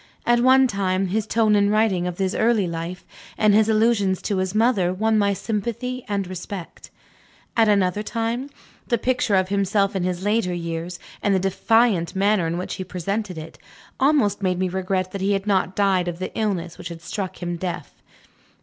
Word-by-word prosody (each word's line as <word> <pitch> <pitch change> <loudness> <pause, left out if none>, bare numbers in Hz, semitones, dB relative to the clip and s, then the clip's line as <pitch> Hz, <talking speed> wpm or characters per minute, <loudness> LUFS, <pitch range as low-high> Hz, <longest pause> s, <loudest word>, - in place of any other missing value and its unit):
At 240 0 +4
one 260 +2 +6
time, 195 -4 0
his 215 +2 -1
tone 220 -2 +3
in 200 0 +3
writing 210 -4 +2
of 175 -1 -5
his 190 -1 0
early 220 -3 +2
life, 170 +2 -5 0.3
and 215 -1 +4
his 215 +1 +4
allusions 215 -4 +2
to 200 - -1
his 185 +1 -2
mother, 215 -6 +3
won 220 +4 +1
my 200 -1 +3
sympathy 235 +5 -3
and 200 -2 -1
respect. 185 0 -8 0.7
At 225 -2 +4
another 200 -1 +2
time, 230 +4 -3 0.4
the 235 - +2
picture 245 -3 +1
of 185 0 +2
himself 200 0 +1
in 190 - 0
his 180 0 -2
later 205 -4 +1
years, 170 +1 -4 0.2
and 200 -1 +2
the - - +2
defiant 195 -1 +2
manner 195 -2 +2
in 165 +1 -2
which 180 - -4
he 190 - -4
presented 185 +1 -3
it, 160 +1 -9 0.4
almost 265 -8 +2
made 185 -2 0
me 185 0 0
regret 185 0 -2
that 195 - -5
he 200 +1 +2
had 195 0 -1
not 190 -2 +1
died 190 -3 +2
of 175 -1 -3
the 185 - -6
illness 185 -6 -2
which - - -6
had 170 -1 -9
struck 190 +1 -5
him 175 -1 -3
deaf. 175 -2 -5
195 Hz, 190 wpm, -23 LUFS, 180-215 Hz, 0.7 s, one